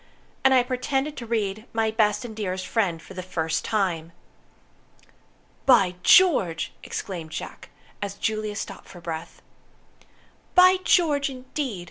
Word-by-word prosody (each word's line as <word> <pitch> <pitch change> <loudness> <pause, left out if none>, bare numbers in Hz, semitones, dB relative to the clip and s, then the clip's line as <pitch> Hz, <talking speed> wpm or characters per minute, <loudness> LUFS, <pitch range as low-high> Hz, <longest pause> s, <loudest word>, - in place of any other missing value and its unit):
And 265 - +5
I 255 -2 +5
pretended 265 +3 -2
to 235 - -7
read, 215 -1 -2
'My 225 -1 +1
Best 220 +2 +1
and 220 -2 -8
Dearest 185 -3 -3
Friend', 190 -8 0
for - - -12
the 185 - -5
first 165 -3 -2
time." 175 -6 -1 1.5
"By 200 -9 +5
George!" 195 - +4
exclaimed 170 -5 -5
Jack, 160 - -7 0.3
as 200 -1 -4
Juliet 215 -1 -2
stopped 195 - -7
for 175 - -12
breath. 165 -1 -7 1.1
"By 365 +1 +7
George, 295 -7 +3
indeed!" 260 -4 -5
215 Hz, 130 wpm, -25 LUFS, 185-255 Hz, 1.5 s, By